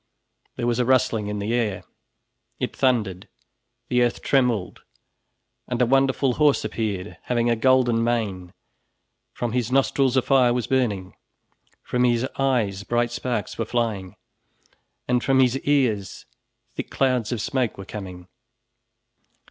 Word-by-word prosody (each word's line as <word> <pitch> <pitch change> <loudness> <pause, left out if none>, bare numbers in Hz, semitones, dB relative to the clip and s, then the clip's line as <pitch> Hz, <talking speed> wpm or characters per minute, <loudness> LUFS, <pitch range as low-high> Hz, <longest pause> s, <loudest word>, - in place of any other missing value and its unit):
There - - -3
was 120 0 0
a - - +3
rustling 125 -4 +2
in 105 0 -3
the 105 +3 -2
air, 115 -5 -1 0.8
it - - -3
thundered, 110 -8 0 0.6
the 125 0 +2
earth 120 -1 0
trembled, 120 -9 +1 0.9
and 125 -1 -3
a 125 - +4
wonderful 135 +1 +2
horse 150 -2 +4
appeared, 105 -3 -3
having 120 -1 +1
a - - +3
golden 120 -1 +3
mane, 105 -7 -2 0.8
from 120 -2 -3
his 120 0 -1
nostrils 135 -1 +2
a 130 - +3
fire 125 -3 +3
was 125 - -1
burning, 105 -8 -1 0.7
from 125 0 0
his 120 +1 +2
eyes 115 -8 0
bright 120 +2 0
sparks 120 -4 -3
were 115 - 0
flying, 110 -5 -2 0.9
and 125 -1 +1
from 135 -1 +3
his 130 0 +3
ears 120 -10 0 0.5
thick - - -5
clouds 125 -4 0
of 120 - -2
smoke 130 0 -1
were 95 - -8
coming. 95 -3 -8
120 Hz, 140 wpm, -23 LUFS, 105-130 Hz, 0.9 s, a